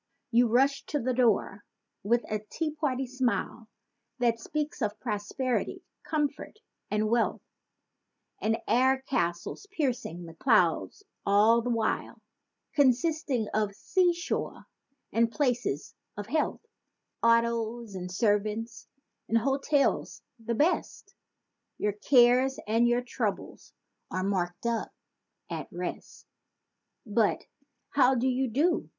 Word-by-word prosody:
You 240 +1 +5
rush 270 +5 +3
to 295 - -2
the 255 0 -1
door 225 -4 +1 0.4
with 235 +4 +1
a 215 - -3
"Tea 305 +9 -4
party" 275 -4 -1
smile 250 -3 -2 0.5
That 235 -2 +1
speaks 300 +4 -4
of 210 -1 -1
prosperity, 240 +3 -2 0.2
comfort 295 +4 -2 0.3
and 210 +1 +1
wealth; 230 +1 +1 1.0
And 225 +1 +1
air 265 +2 +3
castles 175 - -2
piercing 250 - -2
the 165 - -10
clouds 200 - +2 0.2
all 210 +4 +5
the 245 - -3
while: 230 -2 -1 0.5
Consisting 275 -3 +2
of 210 -2 0
"sea 360 - +2
shore" 345 0 -4 0.5
and 230 0 +3
"places 245 - -1 0.2
of 205 - -4
health"— 310 - -1 0.6
Autos 230 -1 +1
and 180 -1 -6
servants 215 +3 -1 0.4
and 230 - +3
hotels—the 270 -3 0
best; 310 +9 0 0.6
Your 210 -1 0
cares 250 +4 +4
and 230 +3 +3
your 240 +1 +2
troubles 245 - -4 0.4
are 185 - -2
marked 180 -1 -2
up—"At 235 -1 -6
Rest!" - - -6 0.8
But! 215 -1 +1 0.5
"How 265 -2 +4
do 250 +1 +1
you 260 +1 +1
do?" 310 +9 +1
235 Hz, 110 wpm, -28 LUFS, 215-265 Hz, 1.0 s, You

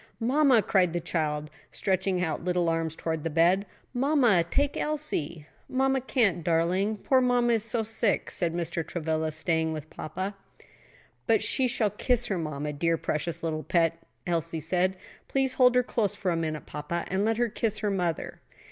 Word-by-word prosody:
"Mamma," 255 -1 +4
cried 180 -4 +2
the 175 - 0
child; 150 -3 -2 0.2
stretching 185 -1 0
out 160 -3 -1
her - - -12
little 180 -2 +1
arms 165 -1 -1
towards 160 -1 -3
the 165 - -2
bed, 175 +5 +3 0.3
"mamma, 250 - +3
take 285 +6 +1
Elsie." 175 - -3 0.2
"Mamma 265 0 +1
can't, 220 - +1
darling; 180 +6 +1
poor 260 +5 +3
mamma 245 -1 +3
is 225 -2 +1
so 230 0 -1
sick," 220 -1 0
said 170 -3 0
Mr. 170 0 -2
Travilla; 160 -1 -2
"stay 160 +1 0
with 155 -1 -5
papa." 185 +6 -5 0.9
"But - - +3
she 260 -2 +2
shall 230 -4 0
kiss 245 +2 0
her 195 -6 -1
mamma, 150 -2 -3
dear, 165 +3 +1
precious 155 +2 -3
little 155 -1 -1
pet," 165 0 +1 0.2
Elsie 165 -1 -1
said. 180 +4 0 0.3
"Please 270 -1 0
hold 250 -1 +5
her 250 - +4
close 220 -5 -1
for 185 -3 -1
a - - 0
minute, 155 -2 -3
papa, 170 +4 -4
and 190 +2 0
let 225 +1 +1
her 240 0 +2
kiss 220 -1 -1
her 210 -1 -1
mother." 175 -4 -2
180 Hz, 175 wpm, -27 LUFS, 165-230 Hz, 0.9 s, hold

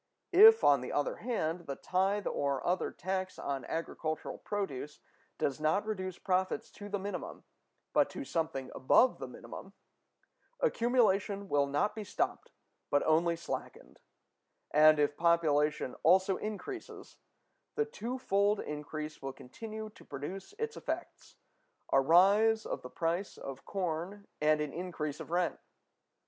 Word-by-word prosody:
If, 445 +5 +9
on - - +5
the - - -5
other - - 0
hand, 175 -8 -2
the 140 - -3
tithe 195 +5 0
or 140 -2 -1
other 180 +1 +1
tax 185 0 -3
on 135 -2 -3
agricultural 155 -1 -4
produce 150 -8 -4 0.4
does 140 +1 -1
not 155 +7 +1
reduce 185 -4 -3
profits 185 0 -1
to 205 0 -9
the 205 - -1
minimum, 200 +1 -6 0.5
but - - +4
to 285 - -6
something 160 - -2
above 245 - +4
the - - -5
minimum, - - -10 0.9
accumulation 220 - +2
will 145 -1 +3
not 145 +9 +1
be 215 0 -5
stopped, - - -2 0.4
but 145 - +3
only 165 +2 +3
slackened; 165 - -7 0.7
and, 155 +1 +7
if 145 0 +2
population 150 -5 +2
also 185 +3 +4
increases, 215 - -7 0.6
the 445 - +1
twofold 210 - 0
increase 150 +1 -5
will 135 0 -5
continue 215 - -8
to - - -16
produce 180 - -7
its 455 0 -3
effects—a 135 - -4
rise 200 +9 +5
of - - -4
the 125 - -8
price 170 +6 -2
of 135 -1 -8
corn 185 +1 -3 0.2
and 155 0 +3
an 150 -2 -3
increase 165 -5 -4
of - - -8
rent. 175 +1 0
180 Hz, 135 wpm, -32 LUFS, 150-205 Hz, 0.9 s, If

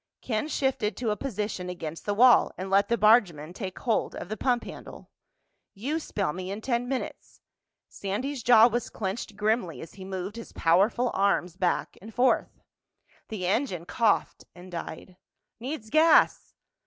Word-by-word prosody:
Ken 220 +3 -1
shifted 265 -9 -1
to 235 -3 -1
a - - 0
position 210 -7 -4
against 165 -1 -7
the 205 - 0
wall 245 +3 +6
and 190 +1 -5
let 200 +1 +4
the 235 - +2
bargeman 190 -8 +3
take 190 -2 -6
hold 230 -4 -1
of - - -7
the 215 - -3
pump 245 0 0
handle. - - -11 0.6
"You 275 +11 -2
spell 195 - -2
me 185 +1 -6
in 200 +2 -4
ten 240 0 -1
minutes." 265 0 -5 0.5
Sandy's 245 +8 -4
jaw 230 -1 +7
was 240 0 -2
clenched 205 +1 -5
grimly 210 -4 -1
as 165 - -10
he 190 - -10
moved 190 +2 -5
his 230 - -9
powerful 205 +9 +2
arms 190 -3 +1
back 180 -2 -1
and 220 +3 -10
forth. 250 +3 +1 0.7
The 205 -5 -5
engine 190 - -1
coughed 220 +2 0
and 180 +1 -12
died. 175 +1 -7 0.4
"Needs 245 -3 -6
gas!" 320 +1 +4
210 Hz, 160 wpm, -27 LUFS, 185-240 Hz, 0.7 s, jaw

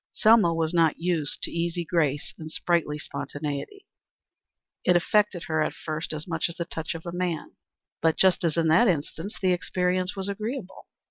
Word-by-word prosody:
Selma 215 -5 +5
was 165 0 0
not 165 -2 +3
used 165 -4 -1
to - - 0
easy 170 0 -1
grace 150 -4 0
and 155 -1 -7
sprightly 165 -3 0
spontaneity. 145 - -5 1.0
It 180 - +4
affected 195 +1 +2
her 155 -1 0
at - - -1
first 155 0 -4 0.2
much 165 -1 -1
as 170 - -7
the 170 - -3
touch 165 -1 -5
of 165 - -7
man; 175 -3 -2 0.5
but 160 0 +3
just 190 -2 +4
as 165 -1 +1
in 165 -1 +3
that 175 +10 +6
instance 165 +3 -2
the 185 -1 +3
experience 180 +1 0
was 195 0 -3
agreeable. 215 +1 -5
170 Hz, 170 wpm, -26 LUFS, 160-185 Hz, 1.0 s, that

